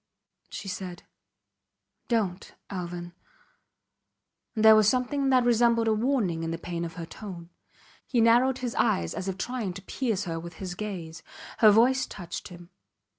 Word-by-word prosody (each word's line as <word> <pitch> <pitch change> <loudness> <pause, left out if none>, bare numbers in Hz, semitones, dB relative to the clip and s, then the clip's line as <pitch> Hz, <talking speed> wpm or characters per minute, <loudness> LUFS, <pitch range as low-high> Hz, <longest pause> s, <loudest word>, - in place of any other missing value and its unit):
She - - -7
said: 185 -2 -6 1.0
Dont 200 -6 -1 0.2
Alvan! 175 -2 -5 1.4
and 220 0 +1
there 220 0 +10
was 215 -1 +5
something 270 +3 0
that 255 -2 +4
resembled 235 -1 +3
a 220 - +4
warning 215 -8 0
in 165 - -3
the 165 - -3
pain 170 0 -4
of 165 -1 -6
her 170 - -5
tone. 175 -2 -9 0.6
He 245 - +1
narrowed 240 +3 +4
his 245 -3 -3
eyes 85 -1 +1
as 190 - -5
if 190 -1 -3
trying 230 -3 -3
to 195 - -8
pierce 220 -2 -2
her 165 -3 -3
with 170 +1 -8
his 185 0 -5
gaze. 175 -6 -6 0.4
Her 215 - +8
voice 245 +5 +4
touched 175 -3 -7
him. 175 -1 -13
200 Hz, 160 wpm, -27 LUFS, 175-235 Hz, 1.4 s, there